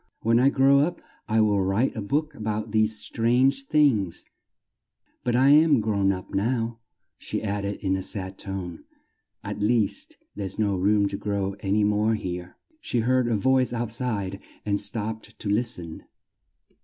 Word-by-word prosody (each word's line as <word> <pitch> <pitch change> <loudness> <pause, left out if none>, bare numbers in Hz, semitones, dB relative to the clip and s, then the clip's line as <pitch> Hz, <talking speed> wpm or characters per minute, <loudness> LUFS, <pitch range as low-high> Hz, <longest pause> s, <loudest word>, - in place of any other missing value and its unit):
When 115 +1 +4
I 130 +2 +5
grow 135 0 +4
up 170 +5 0 0.3
I'll 110 -2 +3
write 95 +7 +1
a 110 - -3
book 150 +9 -1
a - - -15
bout 110 0 -3
these 110 0 +2
strange 130 +6 +1
things 125 - +2 1.0
but 120 -1 0
I'm 145 +2 +5
grown 100 -3 +1
up 95 -1 -6
now," 115 +2 -1 0.4
she - - -4
added 100 -1 -2
in 95 -1 +1
a 95 - -2
sad 95 -1 -3
tone, 95 -4 -6 0.6
"at - - -5
least 105 0 0 0.2
there's 95 -2 -5
no 105 -3 +1
room 100 +2 +2
to 100 - -4
grow 100 -1 -2
an 100 0 0
y 105 - +3
more 105 +2 +2
here." 90 -3 -6 0.2
She 120 - -1
heard 130 +1 +2
a 115 - +1
voice 130 +3 +2
out 120 -2 -2
side 105 -6 -2 0.3
and 100 -1 +1
stopped 110 +1 -4
to - - -7
list 115 +4 +1
en. 85 -2 -9
110 Hz, 165 wpm, -25 LUFS, 100-120 Hz, 1.0 s, I